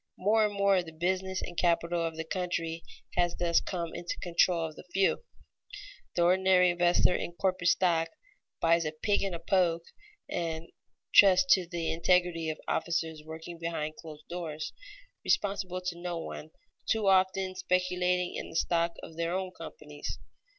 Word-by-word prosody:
More 215 +4 +3
and 210 -1 +1
more 200 -2 +3
the 165 -2 -10
business 185 +3 -1
and 175 - -7
capital 170 0 +1
of 165 -1 -3
the 160 - -2
country 165 -1 -3 0.3
has 175 -1 +1
thus 170 -1 +3
come 170 -3 -4
into 175 0 -4
the - - -10
control 175 -1 +2
of 155 -1 -7
the - - -11
few. 195 - +2 0.9
The 175 - +3
ordinary 180 0 +4
investor 175 +1 +3
in 175 - -3
corporate 185 0 0
stock 165 -3 +2 0.5
"buys 165 0 +3
a 155 -1 -3
pig 200 +6 0
in 195 -3 -2
a - - -6
poke" 170 -1 +1 0.4
and 165 -1 -4 0.4
trusts 185 -2 +7
to 185 -3 +1
the 170 -2 -2
integrity 170 -1 +2
of 155 - -3
officers 160 -2 -1
working 160 +2 -9
behind 160 -2 -3
closed 155 -2 -11
doors, 160 -3 -5 0.5
responsible 195 -3 0
to 180 -1 -4
no 175 -1 -3
one, 160 -1 -7 0.4
too 220 -2 +1
often 190 0 +3
speculating 180 -1 0
in - - -5
the - - -11
stock 170 0 +1
of 160 - -10
their 170 +1 -1
own 185 -1 -2
companies. 150 -2 -7
175 Hz, 165 wpm, -30 LUFS, 165-185 Hz, 0.9 s, trusts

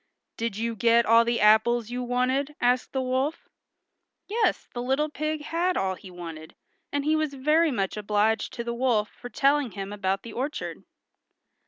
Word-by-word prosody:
"Did 230 -3 -3
you 230 +1 -2
get 235 +1 +4
all 230 +1 +6
the 235 0 0
apples 220 +2 +4
you 250 +1 -3
wanted?" 255 +4 0
asked 245 +1 +1
the 265 -1 -1
wolf. 260 +5 -1 0.8
Yes, 440 +1 0
the 240 - -4
little 270 +5 0
pig 305 0 -3
had 345 +4 0
all 190 -1 0
he 190 +1 -11
wanted, 165 -3 -9 0.4
and 285 0 -1
he 310 +1 +3
was 310 -2 -1
very 305 +5 +3
much 195 -8 -1
obliged 210 +2 +1
to 235 - -4
the 235 0 -3
wolf 235 -4 +1
for 245 - -10
telling 275 -2 +2
him 195 0 -5
about 195 -1 -1
the 230 - -9
orchard. 275 +5 -4
245 Hz, 175 wpm, -26 LUFS, 215-285 Hz, 0.8 s, all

